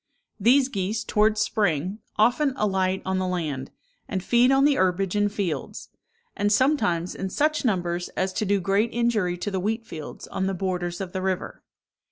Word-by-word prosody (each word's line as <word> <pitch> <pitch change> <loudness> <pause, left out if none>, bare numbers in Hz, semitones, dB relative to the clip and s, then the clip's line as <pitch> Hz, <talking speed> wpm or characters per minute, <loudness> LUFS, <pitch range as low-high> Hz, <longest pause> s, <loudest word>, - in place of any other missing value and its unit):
These 255 +6 +5
geese, 210 -2 -2
towards 215 0 +2
spring, 185 -1 0 0.2
often 260 +6 +3
alight 190 -4 0
on 190 0 0
the 185 - -1
land, 155 -7 -3 0.4
and 190 -3 -3
feed 240 +4 +4
on 270 +1 +4
the 295 - +5
herbage 190 +1 +1
in 205 0 +2
fields; 200 -6 -4 0.5
and 205 0 +1
sometimes 205 - +2
in 190 - -4
such 300 +9 +1
numbers 175 -6 -1
as 185 0 0
to - - -1
do 200 0 +2
great 195 +5 +1
injury 220 -7 +1
to 190 +4 -4
the 190 - -1
wheat 220 +4 -2
fields 155 -6 -8
on 190 - -2
the 195 - -1
borders 180 -1 -2
of 185 -2 -5
the 185 - -2
river. 190 -1 -3
195 Hz, 180 wpm, -25 LUFS, 180-220 Hz, 0.5 s, These